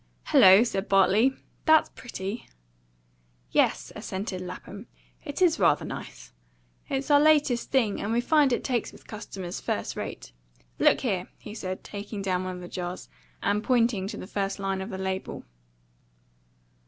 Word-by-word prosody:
"Hello!" 190 Hz, +4 st, +8 dB
said 195 Hz, -4 st, -3 dB
Bartley. 200 Hz, +7 st, +4 dB, 0.3 s
"That's 315 Hz, -1 st, +5 dB
pretty!" 210 Hz, -2 st, -6 dB, 1.0 s
"Yes," -, -, +2 dB
assented 190 Hz, -1 st, -4 dB
Lapham, 190 Hz, +4 st, -8 dB, 0.4 s
"it 295 Hz, +3 st, -1 dB
is 335 Hz, -8 st, +3 dB
rather 170 Hz, -6 st, +3 dB
nice. -, -, -8 dB, 0.6 s
It's 275 Hz, +2 st, -1 dB
our 290 Hz, -, +7 dB
latest 295 Hz, -5 st, +3 dB
thing, 230 Hz, -7 st, +1 dB
and 210 Hz, -, -2 dB
we 235 Hz, -, +2 dB
find 290 Hz, +2 st, +3 dB
it 240 Hz, -, 0 dB
takes 245 Hz, -3 st, -1 dB
with -, -, -17 dB
customers 195 Hz, -4 st, -7 dB
first -, -, -2 dB
rate. -, -, -6 dB, 0.5 s
Look -, -, +4 dB
here!" 195 Hz, -8 st, -1 dB
he 210 Hz, -, -10 dB
said, 185 Hz, -4 st, -5 dB
taking 205 Hz, 0 st, -6 dB
down 185 Hz, -1 st, 0 dB
one 185 Hz, 0 st, -4 dB
of 180 Hz, -, -8 dB
the 175 Hz, -, -8 dB
jars, 180 Hz, 0 st, -6 dB, 0.3 s
and 205 Hz, +1 st, +1 dB
pointing 230 Hz, -6 st, +2 dB
to -, -, -6 dB
the -, -, -7 dB
first 195 Hz, 0 st, -2 dB
line 195 Hz, -1 st, -2 dB
of 190 Hz, -, -5 dB
the 190 Hz, -, -5 dB
label. 190 Hz, 0 st, -4 dB
200 Hz, 155 wpm, -27 LUFS, 190-245 Hz, 1.0 s, Hello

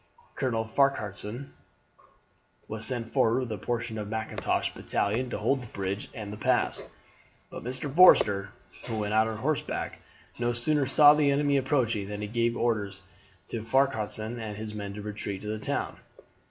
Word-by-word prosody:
Colonel 115 Hz, -4 st, 0 dB
Farquharson 110 Hz, -1 st, -1 dB, 1.1 s
was 110 Hz, 0 st, -4 dB
sent 120 Hz, -3 st, -3 dB
forward 115 Hz, +3 st, +3 dB
with 125 Hz, -3 st, -4 dB
a 110 Hz, -, -2 dB
portion 115 Hz, -2 st, -3 dB
of 105 Hz, -, -4 dB
Mackintosh's 110 Hz, 0 st, -1 dB
battalion 115 Hz, +5 st, -1 dB
to -, -, -3 dB
hold 125 Hz, +6 st, +1 dB
the 120 Hz, -, -9 dB
bridge 100 Hz, 0 st, -4 dB
and 105 Hz, -2 st, -6 dB
the -, -, -7 dB
pass; -, -, +1 dB, 0.7 s
but -, -, -7 dB
Mr. 130 Hz, +3 st, -3 dB
Forster, 100 Hz, -, +6 dB, 0.4 s
who 110 Hz, -, -3 dB
went 105 Hz, 0 st, -1 dB
out 110 Hz, +1 st, +4 dB
on 110 Hz, -1 st, -4 dB
horseback, 140 Hz, +4 st, -2 dB, 0.4 s
no 120 Hz, 0 st, +1 dB
sooner 135 Hz, +4 st, +1 dB
saw 145 Hz, +2 st, +8 dB
the 150 Hz, -1 st, +3 dB
enemy 140 Hz, 0 st, +2 dB
approaching 120 Hz, -7 st, 0 dB
than 105 Hz, 0 st, -5 dB
he -, -, -2 dB
gave 115 Hz, +2 st, 0 dB
orders 100 Hz, -5 st, -1 dB, 0.5 s
to 115 Hz, -, -3 dB
Farquharson 110 Hz, -2 st, 0 dB
and 105 Hz, -2 st, -5 dB
his 110 Hz, 0 st, -5 dB
men 100 Hz, -1 st, -5 dB
to 105 Hz, -, -7 dB
retreat 105 Hz, -2 st, -4 dB
to 105 Hz, -, -4 dB
the 110 Hz, 0 st, -2 dB
town. -, -, -2 dB
110 Hz, 165 wpm, -28 LUFS, 105-130 Hz, 1.1 s, saw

